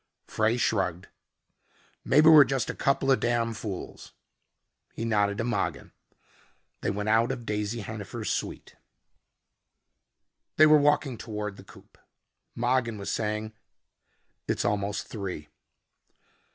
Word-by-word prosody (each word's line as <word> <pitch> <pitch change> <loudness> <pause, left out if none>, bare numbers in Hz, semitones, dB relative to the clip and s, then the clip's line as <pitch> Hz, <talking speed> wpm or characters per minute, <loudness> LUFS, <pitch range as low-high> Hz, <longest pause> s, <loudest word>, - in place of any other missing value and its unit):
Frey 110 +2 0
shrugged. 95 -7 -1 0.9
"Maybe 150 +3 +4
we're 155 -3 +10
just 130 -3 -1
a - - -9
couple 135 0 +1
of 130 - +4
damn 120 -1 0
fools." 105 -4 -7 0.8
He 115 - -4
nodded 105 -3 +1
to - - -1
Mogin. 95 - -2 0.9
They - - -1
went 105 +1 -3
out 115 +3 +3
of 125 -3 -6
Daisy 105 +2 -2
Hennifer's 110 +1 -5
suite. - - -5 1.8
They 155 - +8
were 155 -1 +6
walking 145 -4 +1
toward 105 -2 -5
the - - -12
coupe. - - -18 0.6
Mogin 120 -2 0
was 100 - -4
saying, 110 0 -2 0.9
"It's - - -1
almost 100 0 -1
three." 90 -8 -6
110 Hz, 120 wpm, -27 LUFS, 105-120 Hz, 1.8 s, we're